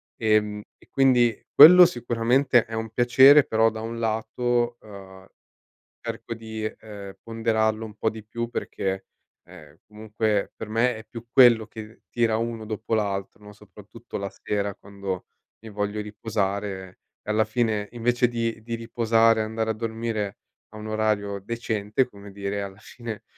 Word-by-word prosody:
ehm, 105 Hz, -2 st, +1 dB, 0.2 s
e -, -, -23 dB
quindi 125 Hz, -4 st, +3 dB
quello 180 Hz, +5 st, +10 dB
sicuramente 120 Hz, -3 st, +2 dB
è 115 Hz, -, -11 dB
un 110 Hz, 0 st, -3 dB
piacere, 130 Hz, +5 st, +6 dB
però 110 Hz, -3 st, +2 dB
da 110 Hz, 0 st, -7 dB
un 115 Hz, +1 st, -5 dB
lato, 120 Hz, +2 st, -1 dB
ehm, 95 Hz, -2 st, -13 dB, 0.7 s
cerco 115 Hz, -, -6 dB
di, 110 Hz, -1 st, -7 dB
ehm, 105 Hz, -2 st, -8 dB
ponderarlo 110 Hz, -1 st, 0 dB
un 110 Hz, -2 st, -9 dB
po' 110 Hz, +1 st, -1 dB
di 110 Hz, -1 st, -10 dB
più 115 Hz, +2 st, -4 dB
perché, 95 Hz, -4 st, -4 dB, 0.4 s
ehm, 80 Hz, -4 st, -15 dB
comunque 105 Hz, -1 st, -2 dB
per 110 Hz, -, -7 dB
me 115 Hz, +2 st, +1 dB
è 110 Hz, -, -10 dB
più 115 Hz, +1 st, -10 dB
quello 120 Hz, -4 st, +6 dB
che 110 Hz, +1 st, -11 dB
tira 115 Hz, -2 st, +1 dB
uno 115 Hz, -1 st, -3 dB
dopo 110 Hz, +1 st, -3 dB
l'altro, 100 Hz, 0 st, -3 dB
no, 105 Hz, -, -11 dB
soprattutto 105 Hz, +2 st, -12 dB
la 100 Hz, 0 st, -3 dB
sera 100 Hz, -1 st, -3 dB
quando 100 Hz, -2 st, -6 dB, 0.3 s
mi 115 Hz, -, -11 dB
voglio 105 Hz, 0 st, -3 dB
riposare 100 Hz, -3 st, -4 dB, 0.2 s
e -, -, -7 dB
alla 110 Hz, +1 st, +3 dB
fine, 110 Hz, -2 st, -1 dB
invece 120 Hz, +1 st, +1 dB
di 115 Hz, -1 st, -3 dB
di 115 Hz, +1 st, -5 dB
riposare, 115 Hz, -1 st, +2 dB
andare 110 Hz, +1 st, -2 dB
a -, -, +2 dB
dormire 110 Hz, -2 st, -4 dB, 0.3 s
a -, -, -11 dB
un 105 Hz, -, -8 dB
orario 105 Hz, -2 st, -1 dB
decente, 115 Hz, +2 st, -1 dB
come 100 Hz, -3 st, -13 dB
dire, 100 Hz, 0 st, -3 dB
alla 100 Hz, 0 st, -8 dB
fine 110 Hz, -1 st, -9 dB
110 Hz, 155 wpm, -25 LUFS, 105-115 Hz, 0.7 s, quello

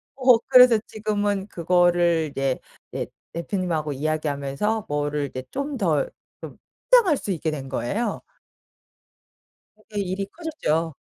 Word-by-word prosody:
어 255 Hz, -3 st, +6 dB
그래서 250 Hz, -2 st, +8 dB
지금은 205 Hz, -2 st, -1 dB
그거를 175 Hz, -2 st, +2 dB
이제 135 Hz, -2 st, -1 dB, 0.3 s
네 -, -, -3 dB, 0.2 s
대표님하고 170 Hz, -4 st, -2 dB
이야기하면서 155 Hz, +7 st, -1 dB
뭐를 145 Hz, 0 st, -1 dB
이제 130 Hz, 0 st, -6 dB
좀 280 Hz, 0 st, -3 dB
더 165 Hz, -, +1 dB, 0.3 s
좀 -, -, -9 dB, 0.3 s
확장할 420 Hz, -, +6 dB
수 200 Hz, -, -4 dB
있게 160 Hz, -2 st, -1 dB
된 140 Hz, -3 st, -5 dB
거예요. 195 Hz, -, -2 dB, 1.6 s
그렇게 210 Hz, -2 st, -4 dB
일이 195 Hz, +1 st, -2 dB
커졌죠. 165 Hz, -, -2 dB
175 Hz, 265 characters per minute, -24 LUFS, 150-215 Hz, 1.6 s, 그래서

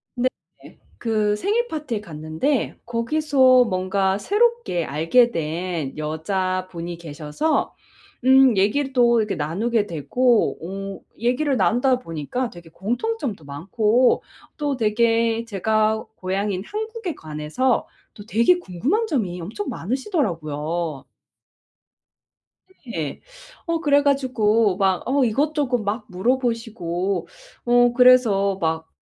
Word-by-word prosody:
네네. 255 Hz, +1 st, -5 dB, 0.2 s
그 215 Hz, -2 st, 0 dB
생일 440 Hz, -, 0 dB
파티에 285 Hz, -, -4 dB
갔는데 160 Hz, -, -2 dB
거기서 255 Hz, +1 st, +3 dB
뭔가 190 Hz, 0 st, 0 dB
새롭게 420 Hz, -, +1 dB
알게 165 Hz, -, +3 dB
된 165 Hz, -, -3 dB
여자분이 175 Hz, +2 st, -3 dB
계셔서 160 Hz, -, -2 dB, 0.5 s
음 260 Hz, -4 st, +6 dB
얘기를 265 Hz, +8 st, +1 dB
또 235 Hz, -2 st, +4 dB
이렇게 210 Hz, -, -2 dB
나누게 205 Hz, +9 st, 0 dB
되고 235 Hz, -, +1 dB, 0.4 s
어 -, -, -21 dB, 0.2 s
얘기를 255 Hz, +4 st, +1 dB
나누다 250 Hz, +2 st, +2 dB
보니까 165 Hz, -, -4 dB
되게 170 Hz, -2 st, -13 dB
공통점도 235 Hz, -, -3 dB
많고 210 Hz, -, +1 dB, 0.3 s
또 290 Hz, -2 st, -1 dB
되게 230 Hz, 0 st, +1 dB
제가 215 Hz, +1 st, 0 dB
고향인 190 Hz, +1 st, -2 dB
한국에 435 Hz, -, -5 dB
관해서 155 Hz, +12 st, -1 dB, 0.3 s
또 205 Hz, -, -12 dB
되게 235 Hz, -, +3 dB
궁금한 335 Hz, -, -1 dB
점이 195 Hz, -, -2 dB
엄청 220 Hz, -, -5 dB
많으시더라고요. 170 Hz, -, -2 dB, 1.8 s
네. 160 Hz, -11 st, -4 dB, 0.5 s
어 335 Hz, -1 st, 0 dB
그래 285 Hz, -3 st, +3 dB
가지고 230 Hz, -8 st, +2 dB
막 190 Hz, -2 st, +1 dB
어 270 Hz, +1 st, +2 dB
이것저것 275 Hz, +1 st, +1 dB
막 215 Hz, +2 st, -3 dB
물어보시고 200 Hz, -5 st, -1 dB, 0.4 s
어 245 Hz, 0 st, +4 dB
그래서 235 Hz, -6 st, +4 dB
막 160 Hz, 0 st, -1 dB
220 Hz, 240 characters per minute, -22 LUFS, 180-260 Hz, 1.8 s, 음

